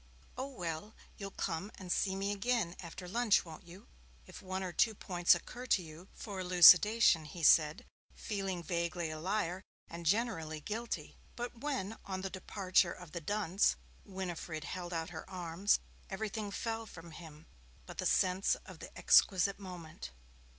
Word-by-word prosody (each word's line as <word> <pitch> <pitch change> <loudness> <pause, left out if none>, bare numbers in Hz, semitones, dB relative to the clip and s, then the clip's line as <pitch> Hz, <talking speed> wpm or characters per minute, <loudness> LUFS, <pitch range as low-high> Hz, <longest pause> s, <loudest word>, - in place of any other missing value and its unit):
'Oh, 260 - -3
well, 180 - -5 0.2
you'll 200 -1 -5
come 190 +1 -3
and 185 -2 -7
see 190 +1 +1
me 195 +1 -1
again 205 -3 0
after 180 +1 -8
lunch, 225 +1 +3
won't 165 +2 -11
you, 180 +3 -13 0.4
if - - -11
one 190 0 -4
or 180 -2 -4
two 220 +5 +3
points 175 -3 +3
occur 250 +1 -8
to 190 - +3
you 160 +3 -12
for 200 -4 -6
elucidation,' 180 0 +7
he 165 +2 -8
said, 155 0 +5 0.3
feeling 195 -4 -3
vaguely 170 -1 -2
a 155 - -6
liar, 185 0 -1 0.3
and 170 0 -7
generally 165 -7 0
guilty. 225 +8 -5 0.2
But 240 -1 -6
when, 235 -7 -3
on 190 -1 -4
the 190 0 -4
departure 185 -1 +1
of 180 -4 -12
the 170 - -5
dunce, 200 - +1 0.3
Winifred 175 -4 -5
held 175 +1 -5
out 165 0 -3
her 160 +2 -8
arms, 180 +1 +1 0.3
everything 210 +1 -3
fell 225 +2 -3
from 170 -3 -11
him 155 -1 -12 0.4
but - - -11
the - - +1
sense 185 +1 +2
of - - -11
the - - -8
exquisite 195 0 +4
moment. 175 -4 -8
185 Hz, 160 wpm, -34 LUFS, 170-205 Hz, 0.4 s, elucidation